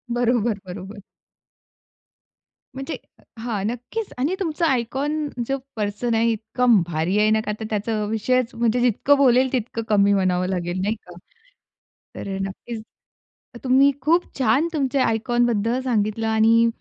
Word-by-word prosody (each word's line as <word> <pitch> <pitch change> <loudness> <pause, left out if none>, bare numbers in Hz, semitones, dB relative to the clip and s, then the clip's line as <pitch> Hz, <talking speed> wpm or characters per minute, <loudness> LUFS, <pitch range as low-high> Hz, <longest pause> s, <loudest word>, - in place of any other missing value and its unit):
बरोबर, 235 -3 +1
बरोबर. 190 +3 -8 1.7
म्हणजे 270 +4 -5 0.4
हां, 225 -4 -3
नक्कीच 245 - -5
आणि 290 +9 0
तुमचं 335 -2 -1
आयकॉन 285 +3 0 0.2
जो 275 - 0 0.2
पर्सन 210 +2 -2
आहे 230 +1 +3
इतकं 220 -1 +2
भारी 170 +4 0
आहे 215 0 +4
नका 220 -1 +1
तर 220 - -4
त्याचा 215 0 -1
विषयच 255 +3 0
म्हणजे 235 +1 +1
जितकं 250 +4 +3
बोलेल 260 -1 +4
तितकं 230 -1 -2
कमी 200 -1 +4
म्हणावं 185 -2 +1
लागेल 180 -1 -2
नाही 210 +3 0
का. 180 -5 -15 1.0
तर 195 - -5
अ, - - -3
नक्कीच 215 +4 -6 0.8
तुम्ही 270 +2 +5
खूप 335 +6 +3 0.2
छान 260 +6 +3
तुमचे 275 -2 0
आयकॉन 240 +1 +2
बद्दल 230 +1 0
सांगितलं 220 -2 0
आणि 225 +1 +4
230 Hz, 135 wpm, -22 LUFS, 210-255 Hz, 1.7 s, तुम्ही